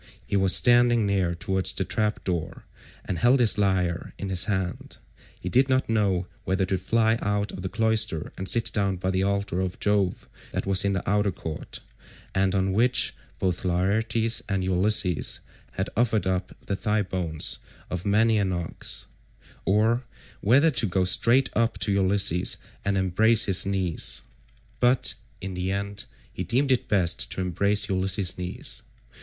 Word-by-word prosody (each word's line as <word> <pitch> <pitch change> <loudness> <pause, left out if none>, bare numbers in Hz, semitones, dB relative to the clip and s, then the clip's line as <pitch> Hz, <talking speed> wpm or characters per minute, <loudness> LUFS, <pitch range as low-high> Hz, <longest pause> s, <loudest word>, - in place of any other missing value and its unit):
He - - -2
was 95 -1 +3
standing 120 -2 +4
near 95 -4 0
towards 95 +2 -2
the - - -2
trap 105 0 -1
door,174 85 -4 -7
and 90 - -3
held 125 +6 +4
his 110 -4 +3
lyre 90 -3 0
in 100 - -5
his 95 -1 +3
hand. 95 -4 -3 0.4
He - - -7
did 130 +9 +3
not 130 0 +2
know 100 -5 +1 0.2
whether 95 0 0
to 95 0 -1
fly 115 +3 +1
out 105 -1 -1
of - - -8
the 95 - -4
cloister 110 -6 0
and 95 0 -3
sit 115 +5 +1
down 100 -2 +1
by 95 +1 -2
the 95 0 0
altar 100 -2 -1
of 95 -1 -4
Jove 100 -3 0 0.3
that - - -2
was 95 -1 +3
in 100 0 +1
the 95 - -3
outer 105 0 +2
court, 80 -3 -7 0.5
and 95 0 +1
on 95 0 +1
which 120 +5 +2 0.2
both 90 -1 -1
Laertes 110 +6 +1
and 95 -2 0
Ulysses 95 -1 +2 0.3
had 95 +2 -3
offered 115 -2 +1
up 95 0 -2
the 100 - -2
thigh 105 +2 0
bones 90 -5 -2 0.3
of 90 -1 -3
many 110 +2 +3
an 95 -2 0
ox, 85 -2 -3 0.6
or 110 +5 +2 0.3
whether 140 +9 +4
to 120 -5 +1
go 95 0 +1
straight 120 +8 +3
up 115 -1 +1
to 105 - 0
Ulysses 95 -2 +2 0.3
and 100 0 0
embrace 105 +5 +3
his 95 -1 +3
knees, 95 -4 +2 0.6
but 125 +1 +3 0.3
in 95 0 -5
the 90 +1 -2
end 100 +1 -3 0.3
he - - -4
deemed 135 +3 +1
it 130 - +1
best 90 -4 +1
to - - -3
embrace 100 +3 0
Ulysses' 95 -1 0
knees. 90 0 -3
100 Hz, 165 wpm, -25 LUFS, 95-110 Hz, 0.6 s, standing